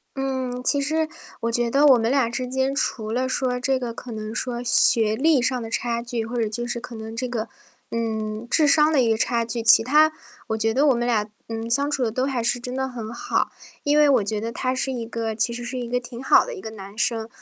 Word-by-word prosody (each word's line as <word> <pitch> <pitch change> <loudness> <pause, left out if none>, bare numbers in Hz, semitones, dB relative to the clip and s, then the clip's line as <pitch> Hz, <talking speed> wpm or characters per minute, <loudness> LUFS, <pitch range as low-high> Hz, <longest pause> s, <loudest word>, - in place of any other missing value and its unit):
嗯， 260 -2 -3
其 285 - +3
实 310 +3 0 0.3
我 230 - -1
觉 235 0 0
得 285 +2 +5
我 265 -3 +7
们 230 +1 0
俩 270 -4 +2
之 250 +2 -3
间， 265 +1 0
除 220 -6 -2
了 255 +3 0
说 255 -1 -1
这 265 +1 +1
个 245 -2 -4
可 240 +1 -9
能 215 0 -5
说 240 0 -3
学 225 -2 +3
历 300 +2 +3
上 255 +1 0
的 225 -1 -7
差 235 -1 -1
距， 240 -2 -3
或 240 +2 -6
者 225 - +1
就 240 +3 -4
是 240 - -2
可 235 - -10
能 220 0 -7
这 255 +2 -2
个， 230 -2 -3 0.4
嗯， 220 -1 -3
智 300 +4 +3
商 300 +1 +5
的 280 - +4
一 235 - +2
个 220 - +2
差 235 0 +1
距， 230 0 -4
其 225 - +7
他 305 +5 +4 0.4
我 220 - 0
觉 225 0 +1
得 270 +6 +2
我 275 - +5
们 240 0 -1
俩， 215 -3 +1 0.2
嗯， 225 0 -4
相 280 +5 +1
处 285 -3 0
得 225 - 0
都 255 +3 -1
还 255 -4 -1
是 240 +1 +1
真 250 +1 -6
的 265 0 -1
很 235 -4 -7
好。 235 - -1 0.3
因 290 +1 +2
为 300 0 +6
我 260 -6 +4
觉 210 +1 -2
得 225 +2 -4
他 255 +2 -2
是 265 +1 -1
一 245 -3 -4
个 225 -1 -3
其 220 +2 +1
实 240 +1 -5
是 250 +1 -4
一 240 -1 -5
个 250 +1 0
挺 245 0 -9
好 - - +5
的 - - -6
一 400 - -8
个 - - -6
男 200 -2 -10
生， 225 0 0
240 Hz, 280 characters per minute, -23 LUFS, 225-265 Hz, 0.4 s, 我